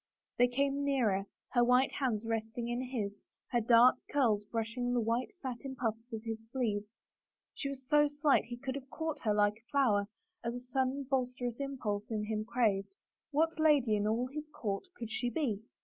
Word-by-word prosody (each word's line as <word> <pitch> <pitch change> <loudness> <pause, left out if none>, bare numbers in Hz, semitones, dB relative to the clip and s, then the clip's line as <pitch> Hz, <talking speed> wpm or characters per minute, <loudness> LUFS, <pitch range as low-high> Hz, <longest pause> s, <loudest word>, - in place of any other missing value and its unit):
They 245 - +7
came 275 +3 0
nearer, 225 -9 +1 0.2
her 240 -2 +4
white 250 +3 +4
hand 235 -6 -1
resting 225 +1 -2
in 240 +1 -1
his, 205 -5 -3 0.3
her 240 - +2
dark 235 +3 +6
curls 225 -8 +2
brushing 235 +3 -2
the - - +3
white 230 - 0
satin 265 +1 -5
puffs 230 -1 -3
of 220 -1 -5
his 225 -1 -5
sleeves. 215 -5 -1 0.6
She 275 - -3
was 265 -2 -7
so 295 0 +5
slight 290 -2 +3
he 240 +1 -6
could 260 +1 -4
have 270 -1 -7
caught 320 0 -3
her 215 -3 +1
like 205 0 +3
a 230 +1 -28
flower 215 -8 +3 0.4
as 235 +1 -2
a - - -4
sudden 260 +2 -1
boisterous 250 -2 -1
impulse 240 -7 -3
in 215 -2 -1
him 215 0 -2
craved. 220 - +1 0.3
What 320 +2 +1
lady 290 -8 +4
in 205 0 +1
all 230 +3 +1
his 300 +4 -6
court 205 - -3
could 230 -2 -6
she 245 +1 0
be 235 -6 -1
245 Hz, 185 wpm, -33 LUFS, 220-270 Hz, 0.6 s, They